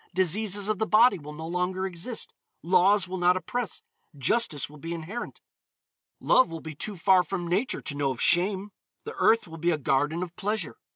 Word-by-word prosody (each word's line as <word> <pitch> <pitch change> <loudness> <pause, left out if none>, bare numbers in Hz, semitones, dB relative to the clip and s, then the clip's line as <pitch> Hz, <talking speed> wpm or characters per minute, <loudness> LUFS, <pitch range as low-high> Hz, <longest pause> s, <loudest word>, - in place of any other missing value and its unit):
Diseases 200 +2 +1
of 215 -2 -1
the 220 - 0
body 225 -1 +5
will 150 0 -9
no 160 +1 -7
longer 180 +2 -2
exist. 190 +6 -5 0.3
Laws 185 +3 +4
will 185 0 -5
not 180 +1 +4
oppress. 240 +3 -4 0.3
Justice 145 - +2
will 150 +1 -15
be 165 +3 -5
inherent. 180 +9 -7 0.8
Love 255 - +4
will 165 0 -6
be 160 0 -8
too 200 +7 -6
far 185 +2 +5
from 180 -1 -4
Nature 195 +9 -1
to - - -5
know 145 -1 0
of 130 -3 -4
shame. 190 +3 +2 0.3
The 450 - -7
earth 230 -3 +3
will 165 0 -10
be 170 +2 +1
a 165 - +1
garden 145 +5 0
of 175 -1 -8
pleasure. 210 -5 -3
180 Hz, 190 wpm, -27 LUFS, 165-205 Hz, 0.8 s, body